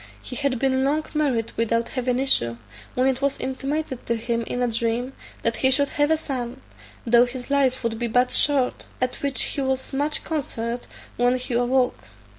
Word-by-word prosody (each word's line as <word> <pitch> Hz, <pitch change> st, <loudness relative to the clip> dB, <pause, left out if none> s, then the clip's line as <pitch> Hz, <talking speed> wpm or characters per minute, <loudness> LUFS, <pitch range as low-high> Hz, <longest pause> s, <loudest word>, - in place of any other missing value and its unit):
"He 250 Hz, -, -8 dB
had 280 Hz, -1 st, 0 dB
been 265 Hz, +1 st, +2 dB
long 300 Hz, +3 st, +1 dB
married 265 Hz, -7 st, 0 dB
without 230 Hz, 0 st, +1 dB
having 250 Hz, -1 st, -1 dB
issue, 120 Hz, -, +2 dB, 0.4 s
when 255 Hz, -, +2 dB
it 265 Hz, 0 st, +1 dB
was 280 Hz, 0 st, +1 dB
intimated 270 Hz, 0 st, -3 dB
to 235 Hz, -, +1 dB
him 230 Hz, +1 st, -1 dB
in 245 Hz, -, -1 dB
a -, -, +2 dB
dream 235 Hz, +3 st, -1 dB, 0.3 s
that 230 Hz, 0 st, +1 dB
he 265 Hz, -, +4 dB
should 280 Hz, +2 st, +3 dB
have 290 Hz, 0 st, +1 dB
a 320 Hz, -, +4 dB
son, 255 Hz, -6 st, -4 dB, 0.5 s
though 240 Hz, +1 st, +6 dB
his 250 Hz, +1 st, -7 dB
life 265 Hz, -2 st, +2 dB
would 225 Hz, -1 st, -1 dB
be 240 Hz, -, 0 dB
but 250 Hz, +2 st, +2 dB
short; 275 Hz, -4 st, +2 dB
at 255 Hz, 0 st, -1 dB
which 280 Hz, -2 st, +1 dB
he 285 Hz, -, -1 dB
was 265 Hz, 0 st, -2 dB
much 290 Hz, +3 st, 0 dB
concerned 240 Hz, -6 st, -3 dB, 0.3 s
when 245 Hz, +1 st, +3 dB
he 250 Hz, 0 st, -4 dB
awoke. 245 Hz, +1 st, +2 dB
255 Hz, 190 wpm, -24 LUFS, 240-275 Hz, 0.5 s, though